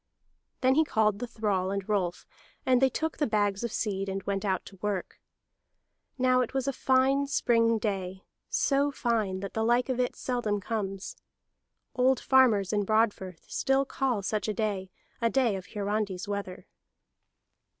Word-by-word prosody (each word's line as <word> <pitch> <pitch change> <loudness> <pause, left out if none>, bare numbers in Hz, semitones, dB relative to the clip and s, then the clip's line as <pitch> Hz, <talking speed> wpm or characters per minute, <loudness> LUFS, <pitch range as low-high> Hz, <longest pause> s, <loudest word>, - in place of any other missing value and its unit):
Then 260 0 +4
he 315 +3 +4
called 215 -7 +1
the 245 - -4
thrall 205 -5 -1
and 195 -1 -3
Rolf; 190 -5 -1 0.4
and 255 -1 +4
they 265 - +5
took 320 +4 -3
the 295 - +1
bags 205 -1 0
of 235 - -2
seed, 195 -3 -2
and 195 0 -3
went 195 0 -2
out 190 -3 -1
to 195 - -12
work. 205 -3 -3 1.0
Now 255 -1 +3
that 250 +1 -1
was 265 0 0
a 275 - +1
fine 265 +2 +2
spring 230 -4 +2
day, 190 -3 -3 0.3
so 280 0 +2
fine 220 -8 -1
that 200 - -6
the 220 - 0
like 240 +3 +2
of 255 -1 -1
it 250 - 0
seldom 240 -5 -1
comes. 195 -2 -4 0.8
Old 260 0 +3
farmers 225 -7 +4
in 205 -1 +2
Broadfirth 200 -4 0
still 270 0 +1
call 255 -6 -1
such 210 +2 -1
a 215 - -2
day 200 -3 -2 0.3
a 230 - +3
day 245 -5 +2
of 185 -1 -7
Hiarandi's 205 -1 -2
weather. 200 -3 -5
215 Hz, 165 wpm, -28 LUFS, 195-255 Hz, 1.0 s, they